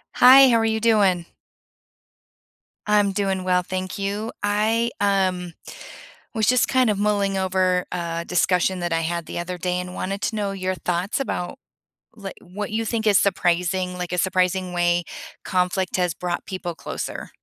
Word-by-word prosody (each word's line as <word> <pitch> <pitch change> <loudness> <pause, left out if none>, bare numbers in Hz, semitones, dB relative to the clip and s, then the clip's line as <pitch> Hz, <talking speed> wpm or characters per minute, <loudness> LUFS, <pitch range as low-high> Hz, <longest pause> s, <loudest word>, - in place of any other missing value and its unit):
Hi, 265 +1 +8
how 230 - +4
are 225 - +1
you 220 0 0
doing? 200 -6 +3 1.6
I'm 205 -1 +3
doing 190 -2 -1
well, 180 0 +2
thank 185 +2 -4
you. 205 +3 -3
I, 220 +3 +1
um, 185 -3 0 0.8
was 220 -2 +1
just 250 0 +3
kind 255 -3 +3
of 205 - -1
mulling 200 -1 +1
over 185 -1 +1
a 170 -1 -3
discussion 180 +1 +1
that 175 -1 -2
I 165 - +1
had 170 +1 -2
the - - -6
other 175 +1 -4
day 180 +1 -2
and 180 0 -7
wanted 195 +2 -4
to 220 - -1
know 200 -2 -2
your 185 -1 -2
thoughts 180 +3 -2
about, 260 -4 -4 0.6
li 200 -3 -7
what 200 +4 -6
you 225 +1 -1
think 225 0 -2
is 205 -2 +5
surprising, 180 -1 0
like, 180 -1 -4
a 180 - -2
surprising 185 0 0
way 175 0 +1 0.4
conflict 180 0 0
has 180 -2 0
brought 175 -1 -4
people 185 -2 -5
closer? - - -6
185 Hz, 165 wpm, -23 LUFS, 180-205 Hz, 1.6 s, Hi